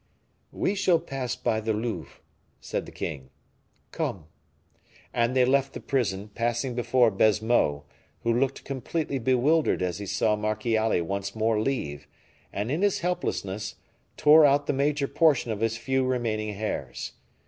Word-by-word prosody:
"We 195 Hz, -, 0 dB
shall 190 Hz, -4 st, +3 dB
pass 130 Hz, -2 st, -4 dB
by 110 Hz, -, 0 dB
the 110 Hz, 0 st, -1 dB
Louvre," 110 Hz, +2 st, -4 dB, 0.4 s
said -, -, -4 dB
the -, -, -10 dB
king. 65 Hz, -2 st, -5 dB, 0.6 s
"Come." 90 Hz, -6 st, -3 dB, 0.9 s
And 120 Hz, +1 st, +1 dB
they 130 Hz, -1 st, +5 dB
left 135 Hz, +1 st, +2 dB
the -, -, -6 dB
prison, 105 Hz, -7 st, -1 dB
passing 120 Hz, +2 st, -1 dB
before 120 Hz, -1 st, +3 dB
Baisemeaux, 105 Hz, -8 st, +2 dB, 0.4 s
who 115 Hz, -, +2 dB
looked 135 Hz, +3 st, 0 dB
completely 140 Hz, +2 st, -3 dB
bewildered 130 Hz, -, +2 dB
as 90 Hz, -1 st, -2 dB
he 100 Hz, -, -6 dB
saw 105 Hz, +3 st, +1 dB
Marchiali 110 Hz, -2 st, 0 dB
once 100 Hz, +3 st, -4 dB
more 110 Hz, 0 st, +1 dB
leave; 90 Hz, -, -3 dB, 0.4 s
and, 105 Hz, +5 st, -3 dB
in 155 Hz, +5 st, 0 dB
his 205 Hz, -1 st, +2 dB
helplessness, 105 Hz, -, -2 dB, 0.4 s
tore 155 Hz, +1 st, +7 dB
out 145 Hz, 0 st, +4 dB
the -, -, 0 dB
major 140 Hz, +1 st, +1 dB
portion 145 Hz, -5 st, +3 dB
of 105 Hz, -, -3 dB
his 115 Hz, 0 st, 0 dB
few 130 Hz, +2 st, 0 dB
remaining 110 Hz, -5 st, -1 dB
hairs. 85 Hz, -, -4 dB
120 Hz, 150 wpm, -27 LUFS, 105-135 Hz, 0.9 s, tore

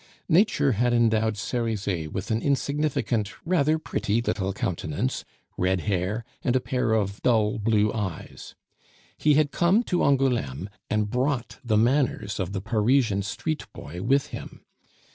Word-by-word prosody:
Nature 180 Hz, -5 st, +4 dB
had 120 Hz, +2 st, +1 dB
endowed 110 Hz, -2 st, +2 dB
Cerizet 100 Hz, -9 st, -2 dB
with 95 Hz, +3 st, -4 dB
an 110 Hz, +1 st, +1 dB
insignificant, 140 Hz, -7 st, 0 dB
rather 160 Hz, -3 st, +2 dB
pretty 115 Hz, -8 st, -1 dB
little 100 Hz, -5 st, -1 dB
countenance, 95 Hz, -, -2 dB, 0.4 s
red 90 Hz, 0 st, +1 dB
hair, 105 Hz, +4 st, -1 dB, 0.2 s
and 125 Hz, -, +1 dB
a -, -, +4 dB
pair 125 Hz, -3 st, 0 dB
of 100 Hz, -2 st, -1 dB
dull 110 Hz, -3 st, +2 dB
blue 105 Hz, -1 st, +2 dB
eyes; 100 Hz, -7 st, -5 dB, 0.6 s
he 150 Hz, -1 st, +3 dB
had 150 Hz, -1 st, +3 dB
come 185 Hz, +7 st, +3 dB
to 180 Hz, -6 st, 0 dB
Angouleme 120 Hz, -, +1 dB, 0.2 s
and 105 Hz, -1 st, 0 dB
brought 125 Hz, 0 st, -1 dB
the 110 Hz, -4 st, +2 dB
manners 120 Hz, -3 st, +1 dB
of 95 Hz, -1 st, -2 dB
the 95 Hz, -1 st, -3 dB
Parisian 115 Hz, 0 st, +2 dB
street 150 Hz, +10 st, -3 dB
boy 85 Hz, +5 st, -8 dB
with 135 Hz, +6 st, +2 dB
him. -, -, -8 dB
115 Hz, 145 wpm, -26 LUFS, 100-135 Hz, 0.6 s, Nature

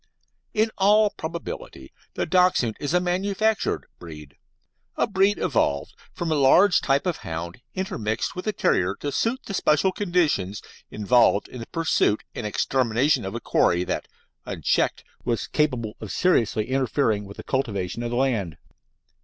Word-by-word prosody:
In 220 Hz, +1 st, +2 dB
all 210 Hz, +2 st, +5 dB
probability 160 Hz, -, -7 dB, 0.2 s
the -, -, -1 dB
Dachshund 180 Hz, -11 st, +3 dB
is 145 Hz, -, -3 dB
a -, -, +5 dB
manufactured 195 Hz, +4 st, 0 dB
breed 75 Hz, -4 st, -11 dB, 0.6 s
a -, -, +3 dB
breed 200 Hz, -1 st, +2 dB
evolved 70 Hz, -1 st, 0 dB, 0.2 s
from 170 Hz, -2 st, -3 dB
a 150 Hz, -2 st, +2 dB
large 180 Hz, +8 st, +5 dB
type 140 Hz, +4 st, +1 dB
of 180 Hz, -3 st, -1 dB
hound 85 Hz, +6 st, -6 dB
intermixed 110 Hz, -, -2 dB
with 180 Hz, +3 st, -6 dB
a -, -, +2 dB
terrier 95 Hz, -, +1 dB
to 145 Hz, +6 st, -4 dB
suit 230 Hz, -, 0 dB
the 200 Hz, -, -6 dB
special 170 Hz, +1 st, +2 dB
conditions 170 Hz, -, 0 dB, 0.3 s
involved 105 Hz, -1 st, +3 dB
in 125 Hz, -, -9 dB
the 115 Hz, -, -7 dB
pursuit 160 Hz, -10 st, +1 dB
and 105 Hz, -, -4 dB
extermination 130 Hz, +5 st, +1 dB
of 95 Hz, +4 st, -5 dB
a -, -, -2 dB
quarry 90 Hz, -6 st, +2 dB
that, -, -, -3 dB, 0.4 s
unchecked, -, -, 0 dB, 0.2 s
was 115 Hz, -5 st, -1 dB
capable 125 Hz, -8 st, -1 dB
of 110 Hz, -, -6 dB
seriously 115 Hz, -, +1 dB
interfering 130 Hz, -5 st, +1 dB
with 100 Hz, +1 st, -11 dB
the -, -, -8 dB
cultivation 110 Hz, -6 st, -2 dB
of 120 Hz, -, -3 dB
the 120 Hz, -, -2 dB
land. 115 Hz, -, 0 dB
135 Hz, 155 wpm, -24 LUFS, -, 0.6 s, all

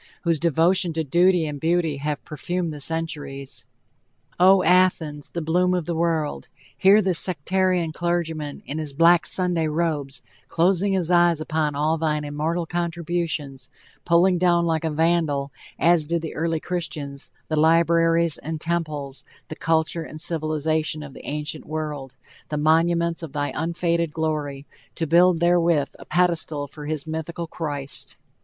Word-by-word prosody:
whose 165 Hz, -3 st, +1 dB
devotion 170 Hz, +3 st, +2 dB
to 160 Hz, 0 st, -1 dB
duty 175 Hz, +3 st, +3 dB
and 145 Hz, -2 st, -5 dB
beauty 165 Hz, -1 st, +1 dB
have 150 Hz, +1 st, -4 dB
perfumed 170 Hz, +3 st, -3 dB
the 150 Hz, -1 st, -8 dB
centuries! 145 Hz, -4 st, -3 dB, 0.7 s
O, 185 Hz, +1 st, +6 dB
Athens, 170 Hz, -5 st, +2 dB
the 170 Hz, -, -4 dB
bloom 180 Hz, +3 st, +2 dB
of 175 Hz, -3 st, -2 dB
the 170 Hz, -, -2 dB
world! 160 Hz, -, -1 dB, 0.3 s
Hear 200 Hz, +3 st, +5 dB
this 185 Hz, -3 st, 0 dB
sectarian 185 Hz, 0 st, 0 dB
clergyman, 165 Hz, -3 st, -3 dB
in 150 Hz, +3 st, -4 dB
his 150 Hz, -3 st, -4 dB
black 165 Hz, +2 st, +5 dB
Sunday 175 Hz, -3 st, 0 dB
robes, 150 Hz, -4 st, -2 dB, 0.2 s
closing 190 Hz, +3 st, +2 dB
his 180 Hz, -2 st, 0 dB
eyes 175 Hz, -2 st, +4 dB
upon 155 Hz, -2 st, -1 dB
all 155 Hz, +3 st, +1 dB
thine 150 Hz, -2 st, 0 dB
immortal 155 Hz, +4 st, -2 dB
contributions, 165 Hz, -5 st, -3 dB, 0.3 s
pulling 175 Hz, +1 st, +3 dB
down 175 Hz, -1 st, +3 dB
like 160 Hz, -1 st, 0 dB
a 160 Hz, -, 0 dB
vandal, 155 Hz, -3 st, +1 dB, 0.3 s
as 165 Hz, 0 st, +3 dB
did 170 Hz, +1 st, -2 dB
the 160 Hz, -, -5 dB
early 165 Hz, 0 st, -1 dB
Christians, 150 Hz, -5 st, -5 dB, 0.2 s
the 155 Hz, -, -1 dB
libraries 165 Hz, +1 st, +3 dB
and 160 Hz, +1 st, -5 dB
temples, 155 Hz, -5 st, -3 dB, 0.3 s
the 155 Hz, -, -6 dB
culture 160 Hz, +1 st, 0 dB
and 155 Hz, -1 st, -8 dB
civilization 155 Hz, -1 st, -1 dB
of 140 Hz, -2 st, -10 dB
the -, -, -11 dB
ancient 150 Hz, +2 st, -4 dB
world 150 Hz, -4 st, -5 dB, 0.3 s
the 150 Hz, -, -2 dB
monuments 165 Hz, +2 st, +2 dB
of 160 Hz, -4 st, -8 dB
thy 145 Hz, -1 st, -1 dB
unfading 170 Hz, +1 st, 0 dB
glory 150 Hz, -3 st, -3 dB, 0.3 s
to 165 Hz, -, -1 dB
build 170 Hz, +2 st, +4 dB
therewith 170 Hz, -4 st, +2 dB
a -, -, -11 dB
pedestal 160 Hz, -3 st, 0 dB
for 145 Hz, +1 st, -10 dB
his 155 Hz, -2 st, -3 dB
mythical 160 Hz, +2 st, -4 dB
Christ! 145 Hz, -4 st, -6 dB
160 Hz, 150 wpm, -23 LUFS, 150-170 Hz, 0.7 s, O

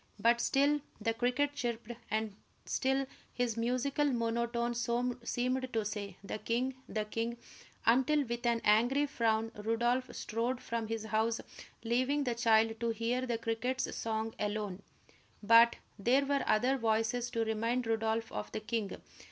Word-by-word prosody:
But 235 Hz, +3 st, +4 dB
still 285 Hz, +3 st, +3 dB, 0.2 s
the 225 Hz, +1 st, 0 dB
cricket 250 Hz, +5 st, +1 dB
chirped, 235 Hz, -4 st, -3 dB, 0.2 s
and 215 Hz, -1 st, -1 dB, 0.3 s
still 270 Hz, +1 st, +1 dB, 0.3 s
his 245 Hz, -3 st, -1 dB
musical 255 Hz, +5 st, 0 dB
monotone 235 Hz, -1 st, 0 dB
seemed 245 Hz, +2 st, -1 dB
to 225 Hz, -3 st, 0 dB
say, 205 Hz, -3 st, -4 dB
"The 200 Hz, -, -5 dB
king 240 Hz, +5 st, 0 dB, 0.2 s
the 215 Hz, -1 st, -1 dB
king," 230 Hz, +2 st, -3 dB, 0.5 s
until, 265 Hz, +6 st, +4 dB
with 235 Hz, -1 st, -4 dB
an 235 Hz, -1 st, +2 dB
angry 240 Hz, +7 st, +4 dB
frown, 225 Hz, -4 st, 0 dB
Rodolph 235 Hz, +4 st, 0 dB
strode 235 Hz, +3 st, -2 dB
from 230 Hz, -2 st, -3 dB
his 225 Hz, -1 st, -3 dB
house, 220 Hz, +1 st, +1 dB, 0.4 s
leaving 255 Hz, +5 st, +1 dB
the 245 Hz, -3 st, 0 dB
child 225 Hz, -1 st, +3 dB
to 235 Hz, -, 0 dB
hear 230 Hz, +3 st, -1 dB
the 235 Hz, -1 st, 0 dB
cricket's 230 Hz, +3 st, -2 dB
song 220 Hz, 0 st, -2 dB
alone. 205 Hz, -2 st, -2 dB, 0.6 s
But 230 Hz, +2 st, +7 dB, 0.2 s
there 255 Hz, +7 st, +3 dB
were 280 Hz, 0 st, +1 dB
other 250 Hz, +5 st, +3 dB
voices 225 Hz, +2 st, +1 dB
to 230 Hz, -1 st, -1 dB
remind 230 Hz, +3 st, 0 dB
Rodolph 225 Hz, 0 st, 0 dB
of 105 Hz, 0 st, -5 dB
the -, -, -1 dB
king. 215 Hz, -1 st, -3 dB
235 Hz, 145 wpm, -33 LUFS, 220-250 Hz, 0.6 s, But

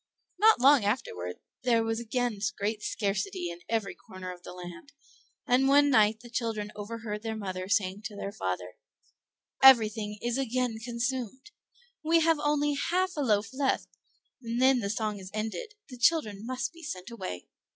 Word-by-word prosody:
Not 440 Hz, +2 st, +6 dB
long 270 Hz, -1 st, +6 dB
afterward 90 Hz, -, -2 dB, 0.3 s
there 235 Hz, -3 st, +3 dB
was 225 Hz, 0 st, -1 dB
again 235 Hz, -1 st, -1 dB, 0.2 s
great 210 Hz, +1 st, -2 dB
scarcity 195 Hz, -4 st, -2 dB
in 170 Hz, -, -9 dB
every 220 Hz, -3 st, -1 dB
corner 185 Hz, -1 st, -9 dB
of 175 Hz, -, -15 dB
the -, -, -9 dB
land; 180 Hz, +9 st, -10 dB, 0.5 s
and 265 Hz, 0 st, +3 dB
one 285 Hz, +1 st, +5 dB
night 215 Hz, -2 st, +4 dB
the 240 Hz, -, -12 dB
children 225 Hz, -3 st, -2 dB
overheard 210 Hz, 0 st, -5 dB
their 225 Hz, 0 st, -3 dB
mother 185 Hz, -3 st, -5 dB
saying 200 Hz, -1 st, +1 dB
to 205 Hz, -, -5 dB
their 200 Hz, 0 st, -5 dB
father, 90 Hz, -, -4 dB, 0.8 s
"Everything 220 Hz, -5 st, +6 dB
is 240 Hz, +4 st, -1 dB
again 250 Hz, -3 st, -1 dB
consumed; 245 Hz, -, -3 dB, 0.5 s
we 330 Hz, +2 st, +4 dB
have 325 Hz, -1 st, +3 dB
only 295 Hz, 0 st, +1 dB, 0.2 s
half 370 Hz, +1 st, +1 dB
a 295 Hz, -, -1 dB
loaf 210 Hz, -3 st, +1 dB
left, 270 Hz, 0 st, 0 dB, 0.5 s
and 235 Hz, 0 st, -3 dB
then 260 Hz, 0 st, +5 dB
the 200 Hz, -3 st, -2 dB
song 215 Hz, -1 st, -2 dB
is 185 Hz, -1 st, -9 dB
ended: 225 Hz, -, -4 dB
the 250 Hz, -2 st, -10 dB
children 230 Hz, -7 st, +2 dB
must 255 Hz, +2 st, -3 dB
be 335 Hz, -, -14 dB
sent 235 Hz, -, -6 dB
away. 185 Hz, -, -6 dB
225 Hz, 165 wpm, -29 LUFS, 200-260 Hz, 0.8 s, Not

